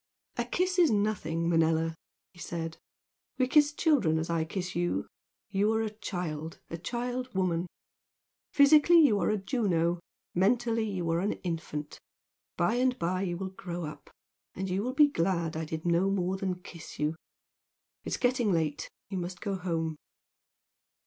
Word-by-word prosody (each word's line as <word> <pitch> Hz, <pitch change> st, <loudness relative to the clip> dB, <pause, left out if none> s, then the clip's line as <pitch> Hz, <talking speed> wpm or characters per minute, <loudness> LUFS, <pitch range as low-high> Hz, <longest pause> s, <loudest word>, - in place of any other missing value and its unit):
"A -, -, -1 dB
kiss 365 Hz, 0 st, 0 dB
is 340 Hz, -, +6 dB
nothing, 200 Hz, -7 st, 0 dB
Manella!" 165 Hz, -1 st, +2 dB, 0.4 s
he 175 Hz, -, -17 dB
said 165 Hz, -1 st, -4 dB, 0.6 s
"We 255 Hz, -, +2 dB
kiss 295 Hz, +2 st, +5 dB
children 285 Hz, -, +2 dB
as 160 Hz, +1 st, -2 dB
I 165 Hz, -1 st, +1 dB
kiss 180 Hz, +1 st, -4 dB
you! 175 Hz, 0 st, 0 dB, 0.5 s
You 205 Hz, +2 st, +2 dB
are 225 Hz, 0 st, +1 dB
a 215 Hz, -, -2 dB
child, 170 Hz, -7 st, -5 dB
a 165 Hz, -, -3 dB
child 245 Hz, +5 st, -3 dB
woman. 180 Hz, -2 st, +1 dB, 0.8 s
Physically 300 Hz, +4 st, +7 dB
you 265 Hz, -10 st, +5 dB
are -, -, +1 dB
a 215 Hz, -, +2 dB
Juno, 180 Hz, -6 st, +1 dB, 0.3 s
mentally 225 Hz, +3 st, +2 dB
you 180 Hz, -4 st, -2 dB
are 165 Hz, -, +2 dB
an 200 Hz, +4 st, 0 dB
infant! 160 Hz, -4 st, -4 dB, 0.6 s
By 175 Hz, +7 st, +2 dB
and 255 Hz, 0 st, +2 dB
by 185 Hz, 0 st, -1 dB
you 175 Hz, -3 st, -2 dB
will 190 Hz, +1 st, -4 dB
grow 175 Hz, -3 st, -5 dB
up, 150 Hz, -1 st, -9 dB, 0.5 s
and 190 Hz, 0 st, -3 dB
you 190 Hz, +2 st, 0 dB
will 255 Hz, +4 st, -3 dB
be 295 Hz, +1 st, +7 dB
glad 170 Hz, -, 0 dB
I 160 Hz, 0 st, -2 dB
did 160 Hz, +1 st, -5 dB
no 175 Hz, +3 st, +3 dB
more 190 Hz, -1 st, 0 dB
than 190 Hz, -1 st, -2 dB
kiss 165 Hz, -2 st, -10 dB
you! 150 Hz, +2 st, 0 dB, 0.9 s
It's -, -, -2 dB
getting 245 Hz, -4 st, +2 dB
late, 160 Hz, -4 st, -1 dB, 0.2 s
you 190 Hz, -, -1 dB
must 180 Hz, +1 st, -5 dB
go 200 Hz, -2 st, -2 dB
home." 165 Hz, -4 st, -2 dB
185 Hz, 160 wpm, -30 LUFS, 165-225 Hz, 0.9 s, Physically